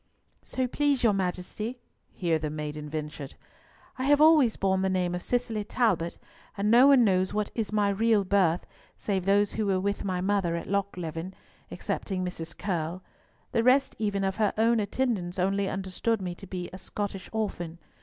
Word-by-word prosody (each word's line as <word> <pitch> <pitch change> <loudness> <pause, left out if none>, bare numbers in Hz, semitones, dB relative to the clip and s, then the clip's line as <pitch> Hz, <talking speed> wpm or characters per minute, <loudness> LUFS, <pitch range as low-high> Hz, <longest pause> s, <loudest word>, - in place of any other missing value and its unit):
"So 260 - -2
please 280 +1 +1
your 225 -3 +5
Majesty," 195 +5 -3 0.3
here 165 -3 0
the 155 -1 -3
maiden 150 0 -5
ventured, 150 -2 -6 0.6
"I 260 - -1
have 290 +1 +5
always 305 -7 +6
borne 190 -1 +1
the 190 - +1
name 180 -2 0
of 180 - -3
Cicely 235 -2 -1
Talbot, 200 -7 0 0.4
and 205 +2 +1
no 245 +4 +8
one 275 -3 +7
knows 190 -2 +2
what 210 -1 -1
is 225 -3 -2
my 210 -1 +2
real 215 +1 +3
birth 185 -3 +2 0.3
save 190 -3 -2
those 200 +1 +3
who 215 -2 -1
were 190 -1 +2
with 200 +2 -1
my 185 -2 -1
mother 190 -3 +1
at 170 - -4
Lochleven, 185 -3 -3 0.3
excepting 185 -2 -3
Mrs. 170 -2 -6
Curll. 175 -1 -3 0.5
The 230 - +2
rest 260 +3 +3
even 205 -2 0
of 190 0 -1
her 215 -2 +2
own 230 +1 +3
attendants 205 -5 -1
only 195 +1 +1
understood 195 +4 -1
me 180 -2 -4
to 195 +3 -11
be 180 -1 -5
a 185 - -7
Scottish 200 -2 -5
orphan. 175 -6 -3
195 Hz, 175 wpm, -28 LUFS, 180-220 Hz, 0.6 s, no